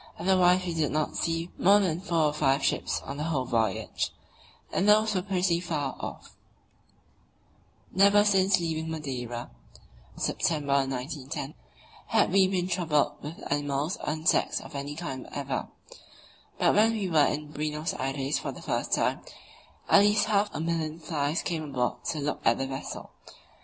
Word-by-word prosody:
Otherwise 185 -1 +3
we 175 - -2
did 160 -3 0
not 155 +1 -1
see 165 +1 -1
more 200 +3 +6
than 180 -4 0
four 170 -4 +1
or 150 - +1
five 140 -2 +2
ships - - 0
on 140 - -6
the 150 - -2
whole 145 -6 0
voyage, 115 -2 -1 0.6
and 195 +3 +2
those 215 +1 +5
were 185 - +1
pretty 180 -3 +1
far 155 -6 -3
off: - - -8 1.6
Never 200 +2 +5
since 195 -1 +4
leaving 160 -1 -2
Madeira 125 -6 -5 0.6
(September, 140 -4 +1
1910) 135 +2 -5 0.5
had - - +2
we 190 0 +5
been 185 -2 -1
troubled 165 -5 0
with 150 +3 -8
animals 145 +3 -1
or - - -2
insects 155 +1 +1
of - - -11
any 140 +1 -5
kind 135 -6 -5
whatever; 140 -2 -4 0.9
but - - +3
when 220 +2 +4
we 210 -4 -1
were 155 -4 +4
in 150 0 -3
Buenos 150 +2 -2
Aires 135 +2 -1
for - - -4
the - - -11
first - - -1
time, - - +1 0.7
at - - +7
least 205 +1 +4
half 210 -1 +2
a - - -5
million 160 -1 -2
flies 155 -1 -1
came 165 -2 -2
aboard 130 -5 -2
to 160 - -2
look 145 0 -2
at 115 - +4
the 135 - -1
vessel. 135 0 -6
160 Hz, 160 wpm, -28 LUFS, 140-185 Hz, 1.6 s, at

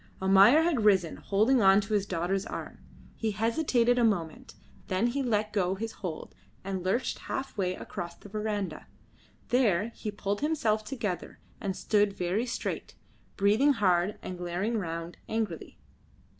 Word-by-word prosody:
Almayer 195 +11 +6
had 315 -10 +1
risen, 190 -6 +3
holding 225 +6 +2
on 195 0 +6
to 210 +2 -5
his 200 -1 +1
daughter's 185 +3 -1
arm. - - -7 0.4
He 225 - -1
hesitated 240 +2 +2
a - - +3
moment, 175 -8 -1 0.3
then 185 +4 +1
he 250 +4 0
let 215 -4 0
go 190 -2 +1
his 225 +3 -4
hold 175 -8 -6 0.3
and 190 -1 -3
lurched 200 +8 0
half 270 0 -3
way 185 -3 -1
across 170 -1 -6
the - - -14
verandah. 205 -5 -3 0.6
There 220 -5 +2
he 220 - -6
pulled 205 0 -3
himself 230 -9 +1
together, 215 -6 -4 0.2
and 190 -2 -3
stood 205 -2 +2
very 185 +7 0
straight, 235 - -4 0.4
breathing 215 +9 +4
hard 195 -2 +2
and 180 -1 -6
glaring 180 +6 -1
round 165 -1 -5
angrily. 220 -7 -3
205 Hz, 150 wpm, -29 LUFS, 185-230 Hz, 0.6 s, Almayer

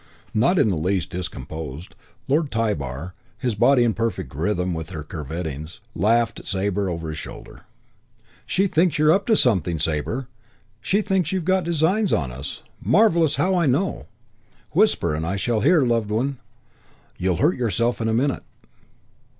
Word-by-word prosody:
Not 170 - +3
in 130 -9 +4
the 90 - -1
least 90 +2 -1
discomposed, 80 -2 -6 0.3
Lord 150 +2 +1
Tybar, 90 - -2 0.2
his 125 -3 -1
body 125 +5 +4
in 115 -2 +2
perfect 115 - -3
rhythm 90 +4 -1
with 80 -1 -5
her 80 -5 -6
curvettings, 80 - -6
laughed 115 +4 +2
at - - -13
Sabre 100 0 -1
over 85 -2 -4
his 80 - -5
shoulder. - - -10 0.8
"She 195 - +2
thinks 175 -2 +2
you're 155 +1 +5
up 195 +3 +2
to 225 - +5
something, 90 - +2
Sabre. 80 - -2 0.5
She 200 - +1
thinks 190 -5 0
you've 185 -4 -2
got 185 0 +2
designs 170 +6 +2
on 65 -6 0
us. 65 +4 -6 0.2
Marvellous 165 - +4
how 190 +1 +1
I 175 -4 +2
know! 155 +9 0 0.6
Whisper - - +3
and 80 +1 -2
I 85 +4 -1
shall 110 +3 0
hear, 160 +1 +4
loved 115 -4 +1
one. 125 +5 -1 0.8
You'll 90 0 +1
hurt 155 +6 +3
yourself 120 0 0
in 110 - 0
a - - +1
minute." 135 +3 +1
110 Hz, 160 wpm, -23 LUFS, -, 0.8 s, you're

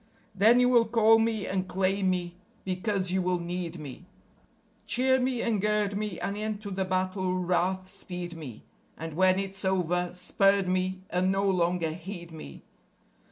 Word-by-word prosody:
Then 220 +5 +5
you 250 - +5
will 240 -3 +4
call 225 0 +5
me 225 -2 0
and 190 -1 -2
claim 190 +1 +1
me 175 -1 -1 0.3
because 185 0 -1
you 190 0 +1
will 180 0 +1
need 175 0 -4
me; 155 +3 -9 0.8
Cheer 260 +4 +3
me 255 -1 0
and 220 -4 0
gird 210 -1 +1
me 210 -3 -3
and 200 - -3
into 210 -1 -4
the 190 0 -1
battle 185 0 -1
wrath 185 +1 0
speed 180 -3 -6
me.... 140 -9 -9 0.3
And 165 0 -6
when 185 +3 +3
it's 195 0 -3
over, 180 -2 0
spurn 195 +1 +2
me 185 0 -1
and 185 +1 +2
no 195 +1 +1
longer 175 -3 +1
heed 175 +1 -8
me. 155 - -10
185 Hz, 160 wpm, -28 LUFS, 180-205 Hz, 0.8 s, Then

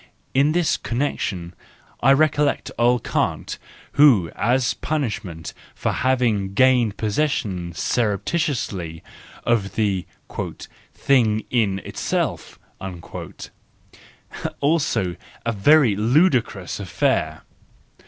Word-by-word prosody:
In 140 +3 +3
this 175 -2 +2
connection 100 -9 -3 0.5
I 135 +3 +6
recollect 150 0 +1
old 120 +1 +3
Kant, - - -2 0.3
who, 120 - +5
as 125 +2 +1
a - - -23
punishment 110 - -3 0.2
for - - -1
having 115 -7 0
gained 125 -4 +4
possession 105 - -1
surreptitiously 105 - -1 0.4
of 100 -5 0
the 100 -5 0 0.9
"thing 110 -5 +2
in 105 -6 +2
itself"—also 90 -3 -5 2.0
a 115 - +1
very 120 +2 +4
ludicrous 125 - +1
affair! - - 0
115 Hz, 85 wpm, -22 LUFS, 100-135 Hz, 2.0 s, I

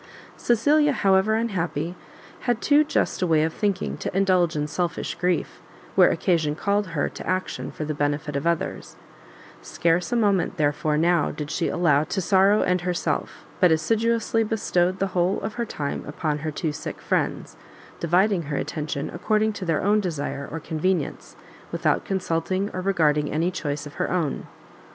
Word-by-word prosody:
Cecilia, 290 +6 +3
however 195 0 +3
unhappy, 175 -7 -2 0.6
had 240 -2 +2
too 295 +3 +4
just 300 - -1
a 180 - +2
way 160 -2 +3
of 160 0 -1
thinking 200 -2 -1
to - - -4
indulge 185 -4 +3
in 150 0 0
selfish 170 +1 -2
grief, 180 0 -1 0.3
where - - +6
occasion 160 -5 +1
called 200 +3 0
her 160 -4 -1
to - - -9
action 185 0 -2
for 155 - -5
the 155 - -2
benefit 145 0 -1
of 140 +4 -1
others: 170 -1 -2 0.7
scarce 170 - 0
a - - +1
moment, 200 -5 +1
therefore 150 0 +1
now 170 0 +3
did 150 0 -5
she 170 - 0
allow 150 -5 +3
to 180 +5 -3
sorrow 195 +2 +4
and 180 -1 +1
herself, 180 -1 -2
but 180 -3 +5
assiduously 225 +7 +1
bestowed 185 -4 0
the 195 - 0
whole 180 +2 +1
of 220 - -4
her 235 -1 -3
time 145 -6 -4
upon 150 0 -2
her 155 +2 -3
two 155 +1 -2
sick 145 - -6
friends, - - -2 0.4
dividing 180 +3 +2
her 145 - -1
attention 150 -1 -3
according 215 +4 +1
to 195 - -6
their 165 -3 0
own 205 +2 +3
desire 145 -6 -3
or 165 - -4
convenience, 160 +1 -2 0.4
without - - 0
consulting 190 +1 -1
or 185 - -3
regarding 155 -6 +2
any 165 +4 0
choice 145 -4 -3
of 145 - -9
her - - 0
own. 170 -6 -1
175 Hz, 170 wpm, -24 LUFS, 155-195 Hz, 0.7 s, where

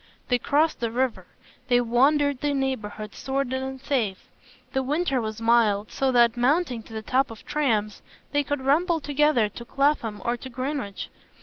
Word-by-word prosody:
They 245 -1 +3
crossed 305 +6 +1
the 235 -1 -1
river; 250 +1 -1 0.4
they 245 -2 +4
wandered 275 +4 +2
in 285 -1 +1
neighbourhoods 215 -5 -4
sordid 265 -1 -1
and 265 0 -5
safe; 230 -9 -2 0.4
the 265 - +1
winter 275 -1 0
was 220 0 -4
mild, 225 -3 +2
so 270 -1 +1
that, 240 -1 +4
mounting 255 0 +1
to 225 - -14
the 220 0 -5
top 265 +5 +1
of 225 -2 -11
trams, 220 -9 0 0.3
they 290 - +2
could 290 -1 -2
rumble 330 +5 +3
together 290 -6 +2
to 235 - -9
Clapham 255 -5 0
or 240 +1 0
to 260 - -9
Greenwich. 255 -4 -4
260 Hz, 170 wpm, -25 LUFS, 230-285 Hz, 0.4 s, they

